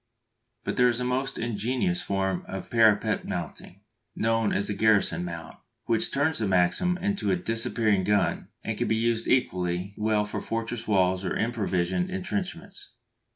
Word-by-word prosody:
But -, -, -3 dB
there 125 Hz, -, +5 dB
is 120 Hz, 0 st, -1 dB
a -, -, -1 dB
most 130 Hz, +2 st, -1 dB
ingenious 125 Hz, -, -1 dB
form 95 Hz, -, -1 dB
of 95 Hz, -, -7 dB
parapet 110 Hz, -3 st, +3 dB
mounting, -, -, -6 dB, 0.3 s
known 115 Hz, -1 st, +1 dB
as 100 Hz, -, 0 dB
the 105 Hz, -, -1 dB
garrison 105 Hz, -4 st, +2 dB
mount, 85 Hz, -1 st, -7 dB, 0.3 s
which 115 Hz, -2 st, +1 dB
turns 145 Hz, +3 st, +1 dB
the 110 Hz, -, 0 dB
Maxim 95 Hz, -, +2 dB
into 200 Hz, -, -1 dB
a 95 Hz, -, +3 dB
"disappearing 110 Hz, 0 st, +2 dB
gun," 105 Hz, 0 st, +1 dB, 0.2 s
and -, -, -2 dB
can -, -, 0 dB
be 110 Hz, -, +2 dB
used 115 Hz, 0 st, 0 dB
equally 90 Hz, -5 st, 0 dB
well 105 Hz, -1 st, +1 dB
for 105 Hz, -, -4 dB
fortress 115 Hz, 0 st, -4 dB
walls 95 Hz, -2 st, +2 dB
or 95 Hz, -, -2 dB
improvised 100 Hz, -6 st, 0 dB
entrenchments. 185 Hz, -2 st, -4 dB
110 Hz, 155 wpm, -27 LUFS, 95-125 Hz, 0.3 s, there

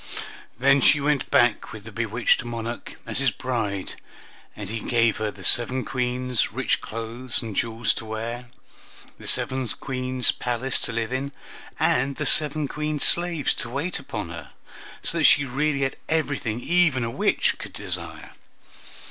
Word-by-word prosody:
Then 135 Hz, +3 st, +4 dB
she 145 Hz, +3 st, +6 dB
went 145 Hz, -1 st, 0 dB
back 120 Hz, 0 st, +3 dB
with 110 Hz, -2 st, -9 dB
the 115 Hz, -, -10 dB
bewitched 115 Hz, +3 st, +1 dB
Monarch, 120 Hz, 0 st, -5 dB
as 115 Hz, +1 st, -3 dB
his 135 Hz, -1 st, +3 dB
bride, 110 Hz, -4 st, -3 dB, 0.6 s
and 105 Hz, -2 st, -7 dB
he 110 Hz, +3 st, -4 dB
gave 115 Hz, -1 st, +2 dB
her 110 Hz, -1 st, -1 dB
the 100 Hz, -2 st, -11 dB
seven 125 Hz, +5 st, +2 dB
Queens' 125 Hz, -1 st, -1 dB
rich -, -, 0 dB
clothes 115 Hz, +3 st, -3 dB
and 110 Hz, -3 st, -6 dB
jewels 115 Hz, +1 st, +1 dB
to -, -, -7 dB
wear, 115 Hz, +3 st, -5 dB, 0.7 s
the -, -, -7 dB
seven 130 Hz, -1 st, +2 dB
Queens' 130 Hz, +4 st, 0 dB
palace 125 Hz, +2 st, -1 dB
to -, -, +2 dB
live 115 Hz, +1 st, -2 dB
in, 135 Hz, +2 st, -2 dB, 0.5 s
and 135 Hz, +2 st, +2 dB
the 150 Hz, -, -3 dB
seven 150 Hz, +1 st, +3 dB
Queens' 150 Hz, +1 st, -2 dB
slaves 170 Hz, -4 st, +4 dB
to 120 Hz, -, -6 dB
wait 145 Hz, +8 st, -2 dB
upon -, -, -6 dB
her; -, -, -8 dB, 0.5 s
so -, -, +1 dB
that -, -, +3 dB
she 145 Hz, -, +6 dB
really 140 Hz, +2 st, 0 dB
had 135 Hz, 0 st, -1 dB
everything 145 Hz, -8 st, -1 dB
even 165 Hz, -6 st, +3 dB
a 115 Hz, -, -2 dB
witch -, -, +1 dB
could -, -, -8 dB
desire. -, -, -3 dB
125 Hz, 160 wpm, -24 LUFS, 115-140 Hz, 0.7 s, she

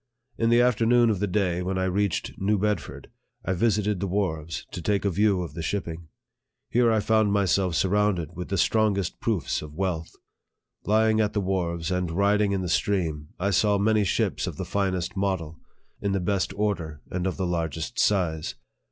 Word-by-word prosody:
In 115 Hz, -, +1 dB
the 120 Hz, +1 st, +5 dB
afternoon 120 Hz, -1 st, +4 dB
of 100 Hz, -, -1 dB
the 105 Hz, -, 0 dB
day 90 Hz, -2 st, 0 dB
when 95 Hz, +1 st, -2 dB
I 95 Hz, -, 0 dB
reached 95 Hz, 0 st, 0 dB
New 105 Hz, +2 st, +2 dB
Bedford, 105 Hz, -2 st, -3 dB, 0.3 s
I 95 Hz, -, 0 dB
visited 105 Hz, 0 st, +1 dB
the 100 Hz, -, -2 dB
wharves, 85 Hz, -6 st, -2 dB
to -, -, -5 dB
take 100 Hz, +3 st, 0 dB
a 100 Hz, -, +2 dB
view 100 Hz, 0 st, +2 dB
of 80 Hz, -4 st, -8 dB
the 85 Hz, -, -5 dB
shipping. 85 Hz, -2 st, -4 dB, 0.6 s
Here 120 Hz, -1 st, +4 dB
I 110 Hz, -, +3 dB
found 110 Hz, -1 st, +2 dB
myself 95 Hz, -3 st, +2 dB
surrounded 95 Hz, -4 st, +1 dB
with 90 Hz, +1 st, -5 dB
the 95 Hz, -, -1 dB
strongest 100 Hz, -2 st, +1 dB
proofs -, -, -1 dB
of 75 Hz, 0 st, -10 dB
wealth. 85 Hz, -3 st, -2 dB, 0.8 s
Lying 110 Hz, +1 st, +3 dB
at 105 Hz, -, 0 dB
the 105 Hz, -, 0 dB
wharves, 90 Hz, -3 st, -1 dB
and 90 Hz, -1 st, 0 dB
riding 100 Hz, +3 st, +2 dB
in 95 Hz, -1 st, 0 dB
the -, -, -2 dB
stream, 85 Hz, -5 st, 0 dB
I 100 Hz, +3 st, 0 dB
saw 100 Hz, +2 st, +3 dB
many 105 Hz, +1 st, +3 dB
ships 95 Hz, -, 0 dB
of -, -, -5 dB
the -, -, -4 dB
finest 95 Hz, -1 st, -1 dB
model, 95 Hz, -5 st, -2 dB, 0.4 s
in 100 Hz, -1 st, 0 dB
the 95 Hz, -, +1 dB
best 95 Hz, +1 st, 0 dB
order, 90 Hz, -8 st, -2 dB
and 90 Hz, 0 st, -1 dB
of 95 Hz, -, -3 dB
the 95 Hz, -, -1 dB
largest 85 Hz, -, -3 dB
size. 85 Hz, -6 st, +1 dB
95 Hz, 185 wpm, -26 LUFS, 85-105 Hz, 0.8 s, the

